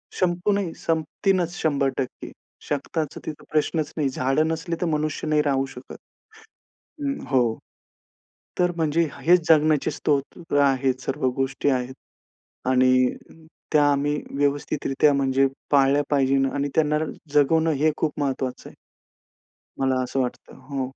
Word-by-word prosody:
संपू 180 Hz, +2 st, +1 dB
नाही, 200 Hz, -5 st, -1 dB
संपतीनच 165 Hz, +3 st, 0 dB
100%. 140 Hz, -3 st, -2 dB, 0.4 s
शक्ताच, 150 Hz, +1 st, -3 dB
तिथं 155 Hz, -, -7 dB
प्रश्नच 155 Hz, 0 st, 0 dB
नाही. 145 Hz, -3 st, +1 dB
झाडं 135 Hz, +4 st, +1 dB
नसली 165 Hz, +1 st, -2 dB
तर -, -, +1 dB
मनुष्य 155 Hz, 0 st, -2 dB
नाही 150 Hz, -1 st, +3 dB
राहू 135 Hz, -2 st, +1 dB
शकत. 125 Hz, -, -10 dB, 1.0 s
हं, 275 Hz, -1 st, -1 dB
हो. 120 Hz, -4 st, +2 dB, 1.0 s
तर 180 Hz, 0 st, +2 dB
म्हणजे 160 Hz, 0 st, +1 dB
हेच 175 Hz, +5 st, +3 dB
जगण्याचे 155 Hz, -2 st, +4 dB
स्रोत 150 Hz, +3 st, -2 dB
आहेत, 130 Hz, -2 st, +2 dB
सर्व 135 Hz, +1 st, -2 dB
गोष्टी 135 Hz, +1 st, -1 dB
आहेत. 130 Hz, -1 st, 0 dB, 0.7 s
आणि 130 Hz, 0 st, +4 dB, 0.8 s
त्या 150 Hz, -1 st, +5 dB
आम्ही 145 Hz, +1 st, +1 dB, 0.2 s
व्यवस्थितरित्या 145 Hz, 0 st, +1 dB
म्हणजे 135 Hz, 0 st, +2 dB, 0.2 s
पाळल्या 140 Hz, 0 st, +4 dB
पाहिजे 135 Hz, -1 st, +3 dB, 0.2 s
आणि 140 Hz, 0 st, -1 dB
त्यांना 150 Hz, -1 st, +2 dB, 0.3 s
जगवणं 160 Hz, +3 st, +3 dB
हे 150 Hz, +2 st, +2 dB
खूप 155 Hz, -2 st, 0 dB
महत्त्वाचं 130 Hz, -2 st, -3 dB
आहे. -, -, -16 dB, 1.0 s
मला 130 Hz, -1 st, +1 dB
असं 125 Hz, +2 st, -3 dB
वाटतं. 125 Hz, -, -5 dB
हो. 135 Hz, -2 st, -2 dB
145 Hz, 125 wpm, -24 LUFS, 135-160 Hz, 1.0 s, त्या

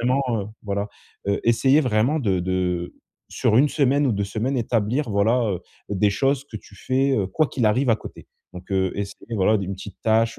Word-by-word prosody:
vraiment, 130 Hz, +3 st, +2 dB, 0.2 s
heu -, -, -7 dB, 0.2 s
voilà. 100 Hz, 0 st, -2 dB, 0.4 s
Heu, 100 Hz, -, +1 dB
essayer 130 Hz, +5 st, +4 dB
vraiment 125 Hz, +3 st, +1 dB
de 95 Hz, -7 st, +1 dB
de 90 Hz, -1 st, -2 dB, 0.3 s
sur 110 Hz, -, +1 dB
1 145 Hz, +3 st, +5 dB
semaine 140 Hz, 0 st, +2 dB
ou 120 Hz, -, +2 dB
2 100 Hz, 0 st, -1 dB
semaines, 115 Hz, +7 st, -2 dB
établir, 115 Hz, +4 st, 0 dB
voilà, 110 Hz, +4 st, +2 dB
heu, 90 Hz, -2 st, -3 dB, 0.3 s
des 100 Hz, +1 st, +2 dB
choses 135 Hz, +6 st, 0 dB
que 115 Hz, -6 st, -8 dB
tu 100 Hz, -, -14 dB
fais, 135 Hz, +6 st, +1 dB
heu, 100 Hz, -, +1 dB
quoi 155 Hz, +11 st, +1 dB
qu'il 120 Hz, -5 st, 0 dB
arrive 125 Hz, +5 st, +2 dB
à 110 Hz, -, +4 dB
côté. 105 Hz, -, -11 dB, 0.3 s
Donc, 90 Hz, +1 st, -11 dB
heu, 95 Hz, -1 st, +1 dB
essaie, 100 Hz, 0 st, -4 dB, 0.2 s
voilà, 105 Hz, +1 st, +3 dB
des 100 Hz, -, -3 dB
une 95 Hz, -, -3 dB
petite 95 Hz, 0 st, -10 dB
tâche, 115 Hz, +1 st, +2 dB
110 Hz, 210 wpm, -23 LUFS, 100-130 Hz, 0.4 s, 1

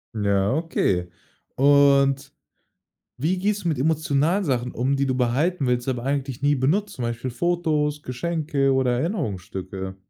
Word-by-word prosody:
Ja, 100 Hz, 0 st, +1 dB
okay 95 Hz, -, 0 dB, 0.5 s
und 140 Hz, 0 st, +4 dB, 0.9 s
wie 165 Hz, +8 st, 0 dB
gehst 205 Hz, +1 st, -1 dB
du -, -, -2 dB
mit 150 Hz, -5 st, -1 dB
emotionalen 160 Hz, +5 st, +1 dB
Sachen 125 Hz, -5 st, -1 dB, 0.2 s
die 140 Hz, -, +1 dB
du 130 Hz, -1 st, 0 dB
behalten 135 Hz, +7 st, 0 dB
willst, 125 Hz, +1 st, 0 dB
aber 125 Hz, -2 st, -2 dB
eigentlich 135 Hz, -2 st, -2 dB
nie 145 Hz, +1 st, +3 dB
benutzt, 195 Hz, +11 st, 0 dB
zum 125 Hz, -, -5 dB
Beispiel 120 Hz, +2 st, -3 dB
Fotos, 150 Hz, 0 st, 0 dB
Geschenke 145 Hz, 0 st, -1 dB
oder 125 Hz, -2 st, +1 dB
Erinnerungsstücke? 95 Hz, -, -4 dB
140 Hz, 135 wpm, -23 LUFS, 125-160 Hz, 0.9 s, und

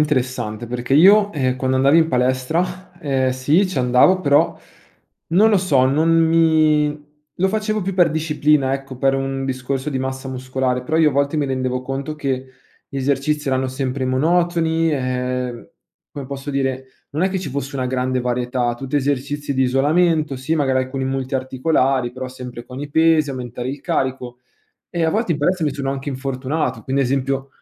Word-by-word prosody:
interessante 125 Hz, -6 st, -1 dB
perché 120 Hz, +2 st, -2 dB
io, 200 Hz, +6 st, +6 dB
ehm, 130 Hz, -3 st, 0 dB
quando 130 Hz, 0 st, 0 dB
andavo 135 Hz, +4 st, +4 dB
in 160 Hz, -, +3 dB
palestra, 165 Hz, +9 st, -1 dB
ehm, 135 Hz, -5 st, 0 dB
sì, 145 Hz, +9 st, +2 dB
ci 185 Hz, -, -6 dB
andavo, 125 Hz, +10 st, +4 dB
però 145 Hz, -1 st, +3 dB, 0.7 s
non 210 Hz, +6 st, +5 dB
lo 205 Hz, -, +4 dB
so, 145 Hz, -9 st, +3 dB
non 150 Hz, +5 st, +2 dB
mi 160 Hz, -2 st, +4 dB, 0.5 s
lo 190 Hz, +2 st, +1 dB
facevo 215 Hz, 0 st, -1 dB
più 195 Hz, +1 st, -2 dB
per 175 Hz, -4 st, +3 dB
disciplina, 150 Hz, -3 st, +1 dB
ecco, 135 Hz, -1 st, -5 dB
per 135 Hz, +1 st, +2 dB
un 135 Hz, 0 st, -2 dB
discorso 130 Hz, +2 st, -3 dB
di 135 Hz, -, -2 dB
massa 130 Hz, 0 st, -4 dB
muscolare. 130 Hz, 0 st, -2 dB
Però 155 Hz, -, -1 dB
io 160 Hz, -2 st, +4 dB
a -, -, -6 dB
volte 140 Hz, +2 st, 0 dB
mi 150 Hz, -, +1 dB
rendevo 130 Hz, -1 st, -2 dB
conto 135 Hz, +3 st, -4 dB
che 135 Hz, -3 st, -3 dB, 0.4 s
gli 140 Hz, -, -8 dB
esercizi 140 Hz, +2 st, 0 dB
erano 130 Hz, 0 st, 0 dB
sempre 130 Hz, 0 st, -3 dB
monotoni, 165 Hz, +3 st, +1 dB
ehm, 125 Hz, -3 st, -2 dB, 0.4 s
come 140 Hz, -2 st, -7 dB
posso 140 Hz, +1 st, -7 dB
dire, 135 Hz, -1 st, -1 dB, 0.3 s
non 155 Hz, +5 st, -2 dB
è 190 Hz, -, +3 dB
che 190 Hz, -, -2 dB
ci 165 Hz, -6 st, -5 dB
fosse 140 Hz, +1 st, -4 dB
una 130 Hz, -, -1 dB
grande 130 Hz, 0 st, -1 dB
varietà. 125 Hz, 0 st, -1 dB
Tutti 135 Hz, +3 st, -3 dB
esercizi 145 Hz, +1 st, -1 dB
di 130 Hz, -1 st, +1 dB
isolamento, 150 Hz, +3 st, +2 dB
sì, 130 Hz, +5 st, -2 dB
magari 135 Hz, -4 st, +1 dB
alcuni 130 Hz, 0 st, -4 dB
multiarticolari, 130 Hz, -1 st, 0 dB
però 130 Hz, 0 st, -6 dB
sempre 125 Hz, -2 st, -9 dB
con 130 Hz, +2 st, -9 dB
i 145 Hz, -, -5 dB
pesi, 160 Hz, 0 st, +3 dB
aumentare 125 Hz, -1 st, -5 dB
il 140 Hz, +1 st, -6 dB
carico, 125 Hz, -2 st, -2 dB, 0.5 s
e 170 Hz, -, -2 dB
a 160 Hz, -, +3 dB
volte 215 Hz, -2 st, 0 dB
in 150 Hz, -, -3 dB
palestra 175 Hz, +3 st, +1 dB
mi 150 Hz, -, 0 dB
sono 135 Hz, -1 st, -3 dB
anche 135 Hz, +1 st, -4 dB
infortunato, 130 Hz, -1 st, -3 dB
quindi 135 Hz, +5 st, -1 dB
ad 125 Hz, -, -1 dB
esempio 135 Hz, 0 st, -1 dB
135 Hz, 180 wpm, -20 LUFS, 130-155 Hz, 0.7 s, io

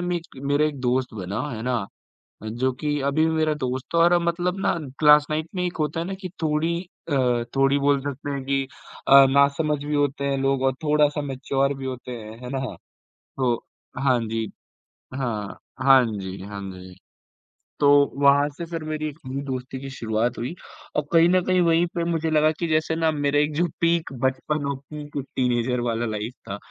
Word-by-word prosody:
मक 175 Hz, -1 st, -1 dB, 0.3 s
मेरा 145 Hz, +2 st, +3 dB
एक 145 Hz, -3 st, -4 dB
दोस्त 125 Hz, -1 st, 0 dB
बना, 95 Hz, 0 st, -4 dB
हैं 110 Hz, -2 st, -5 dB
ना? 120 Hz, -5 st, -1 dB, 0.6 s
जो 120 Hz, +4 st, -1 dB
की 150 Hz, -1 st, 0 dB
अभी 140 Hz, +3 st, +2 dB
भी 160 Hz, -, +1 dB
मेरा 155 Hz, -1 st, +2 dB
दोस्त 130 Hz, -3 st, -3 dB
था -, -, +2 dB
और 170 Hz, +1 st, +5 dB
अब 175 Hz, -, +4 dB
मतलब 175 Hz, +2 st, -1 dB
ना -, -, +3 dB, 0.3 s
क्लास 150 Hz, -1 st, +7 dB
9th 155 Hz, +1 st, -1 dB
में 180 Hz, -, -1 dB
एक 175 Hz, -, -4 dB
होता 155 Hz, +2 st, -1 dB
है 170 Hz, -, -2 dB
ना 195 Hz, -, -4 dB
कि 185 Hz, -, -5 dB
थोड़ी 155 Hz, +2 st, +1 dB, 0.4 s
अ, 125 Hz, -4 st, +2 dB
थोड़ी 135 Hz, +1 st, +4 dB
बोल 140 Hz, -1 st, +2 dB
सकते 145 Hz, +1 st, -5 dB
हैं 140 Hz, -1 st, -3 dB
कि 135 Hz, 0 st, +1 dB, 0.4 s
अ, 135 Hz, 0 st, +9 dB
नासमझ 140 Hz, +2 st, +2 dB
भी 150 Hz, 0 st, -2 dB
होते 140 Hz, -1 st, 0 dB
हैं 140 Hz, -1 st, 0 dB
लोग 135 Hz, -1 st, +1 dB
और 135 Hz, -1 st, +3 dB
थोड़ा-सा 150 Hz, 0 st, +3 dB
मैच्योर 135 Hz, 0 st, -1 dB
भी 135 Hz, -, -6 dB
होते 130 Hz, -1 st, -5 dB
हैं, 110 Hz, -2 st, -8 dB
हैं 125 Hz, -, -6 dB
ना? 135 Hz, -2 st, -3 dB, 0.6 s
तो 125 Hz, -3 st, +2 dB, 0.5 s
हाँ 130 Hz, -3 st, +4 dB
जी। 110 Hz, 0 st, -2 dB, 0.6 s
हाँ, 115 Hz, -7 st, -3 dB, 0.2 s
हाँ 135 Hz, -2 st, +7 dB
जी, 95 Hz, -3 st, -5 dB
हाँ 100 Hz, 0 st, -7 dB
जी। 90 Hz, 0 st, -11 dB, 0.9 s
तो 145 Hz, -, +5 dB, 0.3 s
वहाँ 140 Hz, +1 st, +5 dB
से 170 Hz, -, -4 dB
फिर 165 Hz, -1 st, -5 dB
मेरी 155 Hz, 0 st, -3 dB
एक 145 Hz, -, -12 dB
नई 135 Hz, +2 st, -4 dB
दोस्ती 130 Hz, 0 st, -5 dB
की 135 Hz, -, -6 dB
शुरुआत 115 Hz, -2 st, -1 dB
हुई 125 Hz, +7 st, -3 dB, 0.4 s
और 150 Hz, -, +1 dB
कहीं 165 Hz, 0 st, +6 dB
न 185 Hz, 0 st, +4 dB
कहीं 185 Hz, -1 st, +3 dB
वहीं 170 Hz, 0 st, +4 dB
पे 170 Hz, -, 0 dB
मुझे 165 Hz, -1 st, 0 dB
लगा 155 Hz, 0 st, +4 dB
कि 170 Hz, -, -1 dB
जैसे 160 Hz, 0 st, +1 dB
ना 160 Hz, -1 st, +2 dB
मेरा 145 Hz, -1 st, +1 dB
एक 150 Hz, +1 st, +1 dB
जो 175 Hz, +3 st, +2 dB, 0.2 s
पीक 170 Hz, -2 st, +2 dB
बचपन 140 Hz, +3 st, 0 dB
और -, -, -3 dB
पीक 145 Hz, +1 st, -9 dB, 0.2 s
टीनेजर 125 Hz, -1 st, +1 dB
वाला 120 Hz, 0 st, -1 dB
लाइफ 110 Hz, +2 st, -3 dB, 0.2 s
था, 100 Hz, -, -3 dB
140 Hz, 200 wpm, -24 LUFS, 125-155 Hz, 0.9 s, अ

